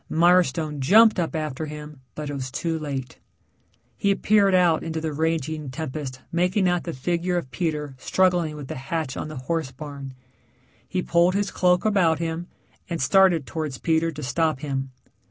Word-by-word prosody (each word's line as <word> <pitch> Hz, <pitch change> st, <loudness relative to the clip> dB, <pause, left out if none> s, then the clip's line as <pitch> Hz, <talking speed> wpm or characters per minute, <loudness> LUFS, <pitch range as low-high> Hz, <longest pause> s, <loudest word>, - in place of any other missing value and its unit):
Mirestone 165 Hz, -3 st, +3 dB
jumped 215 Hz, +9 st, +6 dB
up 170 Hz, 0 st, -1 dB
after 155 Hz, -1 st, -3 dB
him, 150 Hz, -2 st, -9 dB
but 150 Hz, -1 st, -5 dB
it -, -, -5 dB
was 130 Hz, -2 st, -4 dB
too 160 Hz, +5 st, -2 dB
late. 135 Hz, -4 st, -5 dB, 0.8 s
He 200 Hz, 0 st, +2 dB
peered 200 Hz, -2 st, +3 dB
out 175 Hz, -3 st, +4 dB
into 160 Hz, -1 st, -3 dB
the 160 Hz, -1 st, -3 dB
raging 155 Hz, -1 st, -1 dB
tempest 130 Hz, -2 st, -5 dB
making 180 Hz, +3 st, +2 dB
out 180 Hz, -1 st, 0 dB
the 170 Hz, -, -3 dB
figure 175 Hz, +5 st, -1 dB
of 130 Hz, -7 st, -4 dB
Peter 150 Hz, 0 st, -2 dB
struggling 175 Hz, -3 st, +1 dB
with 145 Hz, -3 st, -8 dB
the -, -, -4 dB
hatch 135 Hz, +1 st, -3 dB
on -, -, -4 dB
the 155 Hz, -, -8 dB
horse 150 Hz, +3 st, -2 dB
barn. 140 Hz, -1 st, -8 dB, 0.7 s
He 185 Hz, -1 st, -2 dB
pulled 170 Hz, +2 st, +3 dB
his 205 Hz, 0 st, 0 dB
cloak 180 Hz, +1 st, +2 dB
about 185 Hz, -7 st, +3 dB
him 165 Hz, +1 st, -3 dB, 0.4 s
and 170 Hz, -, -2 dB
started 175 Hz, +1 st, +4 dB
towards 155 Hz, -4 st, -4 dB
Peter 165 Hz, +1 st, +1 dB
to 150 Hz, -, -7 dB
stop 150 Hz, +2 st, 0 dB
him. 135 Hz, -2 st, -3 dB
160 Hz, 170 wpm, -24 LUFS, 145-175 Hz, 0.8 s, jumped